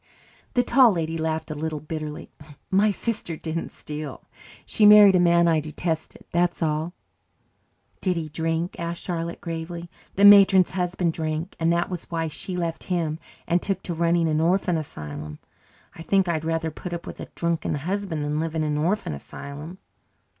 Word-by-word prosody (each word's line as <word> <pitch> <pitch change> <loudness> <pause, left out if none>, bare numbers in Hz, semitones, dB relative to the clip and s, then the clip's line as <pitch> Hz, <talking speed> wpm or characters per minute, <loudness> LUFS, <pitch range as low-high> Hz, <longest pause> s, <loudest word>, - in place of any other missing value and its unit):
The 245 - +4
Tall 245 -3 +5
Lady 165 -2 -2
laughed 160 0 -2
a - - -1
little 155 0 -3
bitterly. 155 0 -6 0.4
"My 200 +3 +4
sister 205 -5 -3
didn't 165 +1 -4
steal. 150 -2 -7 0.4
She 215 - 0
married 210 -2 +9
a - - +5
man 170 0 +4
I 165 -2 +3
detested, 160 +1 -4
that's 175 0 +1
all." 155 +2 -1 1.1
"Did 185 -2 +1
he 165 -2 -3
drink?" 165 +2 -2
asked 170 0 -4
Charlotte 170 -1 -3
gravely. 170 +1 -6 0.2
"The 200 - +5
matron's 195 -2 +8
husband 180 -2 -1
drank 160 +2 -3
and 165 0 +2
that 170 +2 0
was 180 -2 -5
why 165 -1 -2
she 180 +4 -6
left 165 -2 -3
him 165 -4 -1 0.3
and 175 +1 +1
took 195 -2 -2
to 175 - -3
running 170 0 +2
an 155 0 +1
orphan 180 +1 +2
asylum. 75 - -6 0.6
I - - -11
think 195 +2 +2
I'd 160 -2 -1
rather 165 0 -1
put 175 +3 -7
up 170 - -5
with - - -8
a - - -6
drunken 170 -3 -1
husband 175 +1 -3
than 150 +1 -1
live 165 0 -3
in 160 - 0
an 150 -1 -1
orphan 175 - 0
asylum." 145 - -8
165 Hz, 175 wpm, -24 LUFS, 155-180 Hz, 1.1 s, married